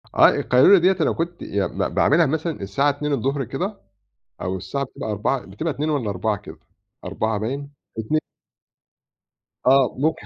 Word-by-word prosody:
آه -, -, +8 dB
القيلولة 130 Hz, +10 st, +5 dB
ديّة 185 Hz, +2 st, +3 dB
أنا -, -, +3 dB
كنت 170 Hz, +1 st, -3 dB
يع 100 Hz, -1 st, -1 dB
ب -, -, -12 dB, 0.2 s
باعملها 165 Hz, +3 st, +4 dB
مثلًا 160 Hz, 0 st, -2 dB
الساعة 100 Hz, +9 st, +1 dB
14:00 140 Hz, -1 st, -1 dB
كده، 185 Hz, -, -4 dB, 0.6 s
أو 95 Hz, +1 st, -2 dB
الساعة 140 Hz, +9 st, -3 dB
بتبقى 110 Hz, -3 st, -7 dB
16:00، 105 Hz, +6 st, 0 dB
بتبقى 130 Hz, -, -3 dB
14:00 150 Hz, +3 st, -2 dB
والّا 125 Hz, -9 st, -1 dB
16:00 105 Hz, +3 st, -1 dB
كده، 100 Hz, -, -12 dB, 0.5 s
16:00 110 Hz, -1 st, -1 dB
باين، 140 Hz, +6 st, -4 dB, 0.3 s
اتني 110 Hz, +8 st, 0 dB, 1.5 s
آه 135 Hz, -1 st, +4 dB
ممكن 155 Hz, +4 st, -1 dB
140 Hz, 150 wpm, -22 LUFS, 110-155 Hz, 1.5 s, آه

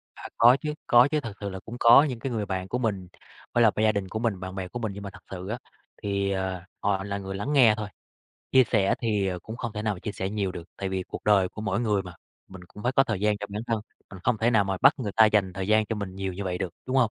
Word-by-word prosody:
À, -, -, -8 dB
có 120 Hz, +3 st, +7 dB
chứ, 150 Hz, -1 st, -2 dB
có 120 Hz, +2 st, +7 dB
chứ 155 Hz, -, +2 dB
thật 115 Hz, -7 st, -6 dB
sự 100 Hz, -1 st, -4 dB
là 95 Hz, 0 st, -6 dB
cũng 115 Hz, -, -9 dB
có 120 Hz, +4 st, +8 dB
những 130 Hz, -6 st, -3 dB
cái 130 Hz, +3 st, -4 dB
người 110 Hz, -3 st, -2 dB
bạn 95 Hz, -1 st, -3 dB
của 125 Hz, -, -2 dB
mình, 105 Hz, -7 st, -2 dB, 0.5 s
với 120 Hz, -, +4 dB
là 110 Hz, -, +6 dB
gia 110 Hz, -, +5 dB
đình 100 Hz, -2 st, -3 dB
của 110 Hz, -, -3 dB
mình, 110 Hz, -5 st, -1 dB
bạn 95 Hz, 0 st, -7 dB
bè 95 Hz, -1 st, -4 dB
của 120 Hz, -, -6 dB
mình 110 Hz, -3 st, -2 dB
nhưng 100 Hz, +1 st, -8 dB
mà 100 Hz, -, -5 dB
thật -, -, -12 dB
sự 95 Hz, 0 st, -6 dB
á 110 Hz, -, -3 dB, 0.5 s
thì, 100 Hz, -1 st, 0 dB
ờ, 95 Hz, -2 st, -2 dB, 0.2 s
họ 100 Hz, -1 st, 0 dB
là 100 Hz, 0 st, -3 dB
người 95 Hz, -1 st, -6 dB
lắng 115 Hz, +9 st, -2 dB
nghe 125 Hz, -6 st, +6 dB
thôi, 105 Hz, -1 st, -4 dB, 0.6 s
chia 130 Hz, -1 st, +7 dB
sẻ 100 Hz, -5 st, +2 dB
thì, 105 Hz, -4 st, 0 dB
ờ, 90 Hz, -1 st, -2 dB
cũng 110 Hz, +6 st, -8 dB
không 120 Hz, -3 st, -4 dB
thể 105 Hz, -, -4 dB
nào 105 Hz, -1 st, 0 dB
mà 90 Hz, -, -11 dB
chia 105 Hz, -, -4 dB
sẻ 95 Hz, -1 st, -3 dB
nhiều 100 Hz, -3 st, -2 dB
được, 85 Hz, -, -7 dB
tại 95 Hz, -, -3 dB
vì 95 Hz, 0 st, -2 dB
cuộc -, -, -9 dB
đời 100 Hz, -3 st, +4 dB
của 105 Hz, -, -9 dB
mỗi 100 Hz, 0 st, -1 dB
người 105 Hz, -4 st, +1 dB
mà 90 Hz, -1 st, -10 dB, 0.3 s
mình 95 Hz, -1 st, -11 dB
cũng 105 Hz, -, -12 dB
phải 125 Hz, -, +1 dB
có 135 Hz, +1 st, +4 dB
thời 110 Hz, -7 st, -2 dB
gian 105 Hz, 0 st, +1 dB
cho 105 Hz, -, -5 dB
bản 105 Hz, +2 st, -4 dB
thân, 115 Hz, -2 st, 0 dB, 0.3 s
mình 95 Hz, -, -9 dB
không 120 Hz, -3 st, +2 dB
thể 115 Hz, +2 st, +2 dB
nào 110 Hz, -4 st, +4 dB
mà 95 Hz, -1 st, -2 dB
bắt 135 Hz, +3 st, +7 dB
người 105 Hz, -6 st, -3 dB
ta 110 Hz, -1 st, +8 dB
dành 105 Hz, -3 st, +2 dB
thời 95 Hz, +1 st, -4 dB
gian 110 Hz, 0 st, +4 dB
cho 115 Hz, -, -2 dB
mình 100 Hz, -3 st, -5 dB
nhiều 95 Hz, -1 st, -3 dB
như 100 Hz, +3 st, -5 dB
vậy 90 Hz, -1 st, -2 dB
được, 95 Hz, -3 st, -4 dB
đúng 130 Hz, +1 st, -1 dB
hông? 120 Hz, -4 st, +4 dB
105 Hz, 310 wpm, -26 LUFS, 95-115 Hz, 0.6 s, có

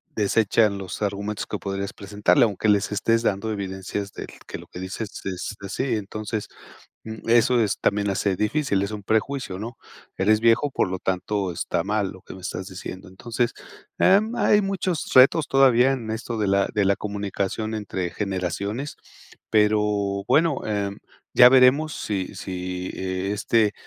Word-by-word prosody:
desechan 105 Hz, 0 st, +2 dB
los 95 Hz, +1 st, -7 dB
argumentos 100 Hz, +1 st, -3 dB
que -, -, -3 dB
podrías 100 Hz, 0 st, -4 dB
presentarle, 105 Hz, +7 st, +2 dB
aunque 105 Hz, 0 st, -1 dB
les 105 Hz, 0 st, +2 dB
estés 115 Hz, +3 st, +1 dB
dando 110 Hz, 0 st, 0 dB
evidencias 100 Hz, 0 st, -4 dB
del -, -, -7 dB, 0.2 s
que -, -, -7 dB
lo -, -, -13 dB
que 90 Hz, -, -10 dB
dices 95 Hz, +3 st, -5 dB, 0.2 s
es 95 Hz, +2 st, -4 dB
así. 110 Hz, +5 st, -2 dB
Entonces, 105 Hz, +1 st, -4 dB, 0.6 s
mm, 110 Hz, 0 st, -8 dB
eso 120 Hz, +1 st, +4 dB
es 105 Hz, -4 st, 0 dB
también 100 Hz, 0 st, +1 dB
hace 100 Hz, 0 st, 0 dB
difícil, 105 Hz, +1 st, 0 dB
es 100 Hz, -, -2 dB
un 105 Hz, -1 st, -6 dB
prejuicio, 110 Hz, -1 st, -1 dB
¿no? 115 Hz, +3 st, -6 dB, 0.4 s
Eres 105 Hz, +3 st, +3 dB
viejo, 115 Hz, +5 st, +3 dB
por 130 Hz, -, 0 dB
lo 95 Hz, 0 st, -3 dB
tanto 95 Hz, +1 st, -2 dB
está 85 Hz, -, -2 dB
mal 105 Hz, -1 st, 0 dB
lo 95 Hz, -, -13 dB
que -, -, -12 dB
me 95 Hz, -, -10 dB
estás 95 Hz, +1 st, -5 dB
diciendo. 95 Hz, 0 st, -8 dB
Entonces, 120 Hz, +5 st, -2 dB, 0.5 s
em, 215 Hz, +5 st, +4 dB
hay 210 Hz, -3 st, +3 dB
muchos 190 Hz, -4 st, -2 dB
retos 135 Hz, +4 st, +6 dB
todavía 135 Hz, -1 st, +5 dB
en 120 Hz, -5 st, -4 dB
esto 110 Hz, +1 st, -4 dB
de 105 Hz, -, +1 dB
la 100 Hz, 0 st, +2 dB
de 105 Hz, -2 st, +1 dB
la 100 Hz, 0 st, +3 dB
comunicación 105 Hz, +1 st, -3 dB
entre 100 Hz, -4 st, -3 dB
generaciones, 100 Hz, -, -3 dB, 0.5 s
pero 105 Hz, -2 st, +2 dB
bueno, 160 Hz, -2 st, +2 dB
em, 100 Hz, -2 st, -2 dB, 0.4 s
ya 125 Hz, 0 st, +9 dB
veremos 135 Hz, +4 st, +5 dB
si 95 Hz, -3 st, -3 dB
si 90 Hz, -1 st, -5 dB
e 95 Hz, +1 st, -3 dB
este, 105 Hz, +1 st, +2 dB
105 Hz, 165 wpm, -24 LUFS, 100-115 Hz, 0.6 s, ya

